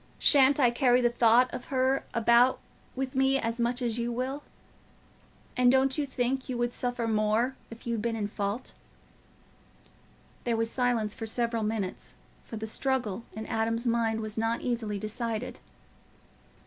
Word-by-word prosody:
Shan't 280 Hz, 0 st, +5 dB
I 245 Hz, -4 st, +5 dB
carry 245 Hz, 0 st, +3 dB
the 240 Hz, -1 st, +2 dB
thought 240 Hz, +1 st, +4 dB
of 245 Hz, -, -6 dB
her 265 Hz, 0 st, +1 dB
about 235 Hz, +2 st, +4 dB, 0.4 s
with 265 Hz, 0 st, -3 dB
me 270 Hz, +1 st, +3 dB
as 230 Hz, -2 st, -2 dB
much 240 Hz, +2 st, 0 dB
as 235 Hz, -1 st, -1 dB
you 235 Hz, 0 st, -1 dB
will? 260 Hz, +4 st, -3 dB, 1.1 s
And 250 Hz, -1 st, +5 dB
don't 265 Hz, 0 st, +3 dB
you 295 Hz, -2 st, -1 dB
think 260 Hz, 0 st, -2 dB
you 250 Hz, -, -2 dB
would 240 Hz, 0 st, -1 dB
suffer 245 Hz, -2 st, -1 dB
more 220 Hz, +4 st, +1 dB
if 230 Hz, 0 st, -12 dB
you'd 230 Hz, -2 st, -1 dB
been 230 Hz, 0 st, -1 dB
in 210 Hz, -2 st, -2 dB
fault?" 205 Hz, +3 st, -4 dB, 1.7 s
There 235 Hz, -2 st, 0 dB
was 225 Hz, 0 st, 0 dB
silence 240 Hz, -4 st, 0 dB
for 225 Hz, -, -6 dB
several 230 Hz, 0 st, 0 dB
minutes, 210 Hz, -3 st, -3 dB, 0.3 s
for 225 Hz, -, -7 dB
the 220 Hz, -, -4 dB
struggle 235 Hz, -2 st, -2 dB
in 220 Hz, 0 st, -6 dB
Adam's 230 Hz, +2 st, -1 dB
mind 230 Hz, -2 st, +1 dB
was 215 Hz, 0 st, -4 dB
not 225 Hz, +1 st, 0 dB
easily 230 Hz, -4 st, -2 dB
decided. 220 Hz, +3 st, -4 dB
235 Hz, 160 wpm, -28 LUFS, 225-255 Hz, 1.7 s, Shan't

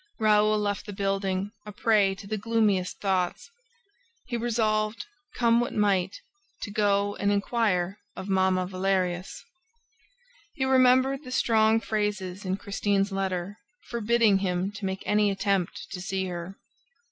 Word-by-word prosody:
Raoul 215 Hz, -1 st, +3 dB
left 205 Hz, 0 st, -2 dB
the 205 Hz, -, -6 dB
building 195 Hz, 0 st, -1 dB
a 210 Hz, -, -8 dB
prey 205 Hz, -2 st, +2 dB
to 195 Hz, -, -11 dB
the 215 Hz, +2 st, -3 dB
gloomiest 210 Hz, -4 st, 0 dB
thoughts. 190 Hz, -, -1 dB, 0.7 s
He 240 Hz, -, -4 dB
resolved, 220 Hz, -, 0 dB, 0.3 s
come 235 Hz, -1 st, +3 dB
what 240 Hz, -, -2 dB
might, 195 Hz, -3 st, +1 dB, 0.4 s
to 205 Hz, -, -5 dB
go 205 Hz, -1 st, +1 dB
and 200 Hz, 0 st, +1 dB
inquire 200 Hz, -3 st, 0 dB, 0.2 s
of 190 Hz, -, -7 dB
Mamma 190 Hz, -1 st, +2 dB
Valerius. 185 Hz, -, -2 dB, 1.1 s
He 265 Hz, -4 st, 0 dB
remembered 260 Hz, +1 st, +4 dB
the 255 Hz, -, -9 dB
strong 225 Hz, -3 st, +3 dB
phrases 205 Hz, -4 st, -3 dB
in 185 Hz, +1 st, -1 dB
Christine's 200 Hz, 0 st, 0 dB
letter, 195 Hz, 0 st, -3 dB, 0.3 s
forbidding 230 Hz, -3 st, +3 dB
him 185 Hz, 0 st, -1 dB
to 200 Hz, 0 st, -7 dB
make 190 Hz, 0 st, -3 dB
any 210 Hz, 0 st, +3 dB
attempt 195 Hz, -2 st, -1 dB
to 180 Hz, -, -5 dB
see 190 Hz, +1 st, -2 dB
her. 175 Hz, +2 st, -6 dB
200 Hz, 135 wpm, -27 LUFS, 190-220 Hz, 1.1 s, remembered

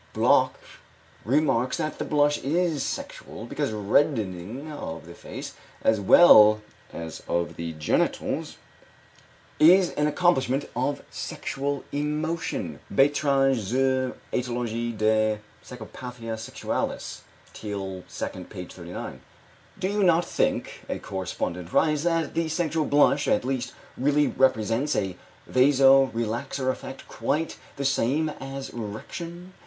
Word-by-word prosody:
Bloch -, -, +3 dB, 0.7 s
remarks 130 Hz, -1 st, +2 dB
that 155 Hz, -2 st, -3 dB
the -, -, -2 dB
blush 145 Hz, 0 st, +2 dB
is 160 Hz, 0 st, 0 dB
sexual, -, -, -5 dB
because -, -, -2 dB
reddening 110 Hz, -, 0 dB
of 85 Hz, -, -6 dB
the 85 Hz, -, -10 dB
face, -, -, -8 dB, 0.3 s
as 110 Hz, -1 st, +3 dB
well 105 Hz, -, +8 dB, 0.3 s
as 80 Hz, -1 st, -7 dB
of 85 Hz, 0 st, -1 dB
the 85 Hz, -1 st, -5 dB
genitals, 75 Hz, -1 st, -1 dB, 1.0 s
is 180 Hz, +4 st, +6 dB
an 150 Hz, -, +1 dB
accompaniment 145 Hz, -4 st, +2 dB
of 130 Hz, +4 st, -1 dB
sexual 140 Hz, 0 st, -3 dB
emotion 150 Hz, +3 st, -2 dB
(Beiträge 140 Hz, -1 st, +3 dB
zur 130 Hz, +4 st, 0 dB, 0.2 s
Ætiologie 120 Hz, -2 st, -2 dB
der 110 Hz, 0 st, +2 dB, 0.3 s
Psychopathia 125 Hz, -1 st, -8 dB
Sexualis, 110 Hz, 0 st, -4 dB, 0.3 s
Teil 95 Hz, -3 st, -5 dB, 0.3 s
II, -, -, -8 dB
p. -, -, -8 dB
39). -, -, -8 dB, 0.6 s
"Do 190 Hz, -1 st, -1 dB
you 205 Hz, +1 st, 0 dB
not 175 Hz, -2 st, +4 dB
think," -, -, -1 dB
a -, -, -1 dB
correspondent 90 Hz, -2 st, -4 dB
writes, 150 Hz, -2 st, +3 dB
"that 165 Hz, -2 st, +1 dB
the 165 Hz, -1 st, 0 dB
sexual 160 Hz, -1 st, 0 dB
blush, 145 Hz, 0 st, +3 dB
at -, -, +2 dB
least, 130 Hz, -1 st, -2 dB, 0.2 s
really 145 Hz, +3 st, +2 dB
represents 130 Hz, +2 st, +1 dB
a 95 Hz, -3 st, -1 dB, 0.3 s
vaso 135 Hz, +1 st, +5 dB
relaxor 120 Hz, +4 st, -2 dB
effect 135 Hz, +1 st, -9 dB
quite 155 Hz, +4 st, -2 dB, 0.2 s
the 140 Hz, -, -3 dB
same 140 Hz, +3 st, +1 dB
as 135 Hz, 0 st, -6 dB
erection? 170 Hz, -, -7 dB
135 Hz, 115 wpm, -26 LUFS, 110-150 Hz, 1.0 s, well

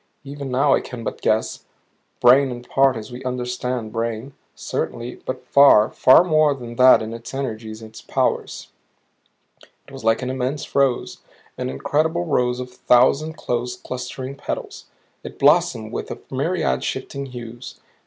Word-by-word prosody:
Even 140 Hz, 0 st, -7 dB
now 135 Hz, +2 st, +3 dB
I -, -, +2 dB
can 120 Hz, -2 st, -8 dB
but -, -, -5 dB
guess 110 Hz, +1 st, 0 dB, 0.6 s
brain 130 Hz, +3 st, +6 dB
in 120 Hz, -1 st, -7 dB
part 135 Hz, 0 st, +2 dB
as 110 Hz, +2 st, -8 dB
we 125 Hz, +2 st, -8 dB
understand 125 Hz, -2 st, -3 dB
brain, 115 Hz, +3 st, -3 dB, 0.2 s
certainly; 120 Hz, +1 st, -4 dB
but 130 Hz, -, -5 dB
far, 140 Hz, -6 st, +6 dB
far 130 Hz, +6 st, +6 dB
more 155 Hz, -4 st, +3 dB
than 120 Hz, -3 st, -9 dB
that 130 Hz, -2 st, +7 dB
in 110 Hz, +1 st, -6 dB
its 115 Hz, +3 st, -8 dB
energies, 110 Hz, -4 st, -5 dB
its 110 Hz, 0 st, -11 dB
powers. -, -, -2 dB, 1.2 s
It -, -, -15 dB
was -, -, -9 dB
like 115 Hz, +3 st, +2 dB
an 125 Hz, -, -2 dB
immense 130 Hz, +2 st, -3 dB
rose. 135 Hz, -3 st, +1 dB, 0.4 s
An -, -, -4 dB
incredible 160 Hz, -, 0 dB
rose 125 Hz, -5 st, 0 dB
of 125 Hz, 0 st, -6 dB
a -, -, -21 dB
thousand 130 Hz, +5 st, +3 dB
close 125 Hz, 0 st, -2 dB
clustering 130 Hz, +2 st, -6 dB
petals. 140 Hz, -, -6 dB, 0.4 s
It -, -, -9 dB
blossomed 110 Hz, -1 st, +3 dB
with -, -, -4 dB
a -, -, -5 dB
myriad 155 Hz, +5 st, -1 dB
shifting 140 Hz, +1 st, -4 dB
hues. 120 Hz, -1 st, -9 dB
125 Hz, 155 wpm, -21 LUFS, 120-140 Hz, 1.2 s, that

